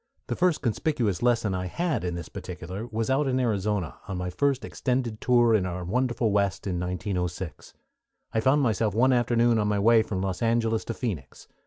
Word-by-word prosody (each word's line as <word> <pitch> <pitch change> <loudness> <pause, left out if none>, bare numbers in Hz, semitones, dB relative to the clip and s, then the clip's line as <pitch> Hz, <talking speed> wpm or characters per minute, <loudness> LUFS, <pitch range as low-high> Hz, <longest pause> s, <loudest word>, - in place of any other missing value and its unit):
The - - -3
first 175 -3 +1
conspicuous 120 - 0
lesson 120 -4 +2
I 90 0 -2
had 170 - -1
in 90 -1 -2
this 85 -2 -6
particular 95 +7 -7
was 115 +1 -2
out 140 +2 +2
in 130 -1 +1
Arizona 105 - -1
on 95 - -4
my 90 0 -3
first 140 +5 0
extended 125 -4 -2
tour 120 -2 +4
in 105 -4 +3
our 90 0 -4
wonderful 120 +2 0
West 100 -1 0
in 90 -3 -2
1906. 90 0 -4 0.6
I 110 - +2
found 135 +5 +3
myself 110 -3 +1
one 130 +3 +4
afternoon 120 -1 +3
on 105 - +1
my 105 0 +1
way 115 +3 +5
from 100 -3 -3
Los 95 -2 -3
Angeles 115 -1 +1
to 115 - -4
Phoenix. 90 - -5
110 Hz, 190 wpm, -26 LUFS, 95-120 Hz, 0.6 s, way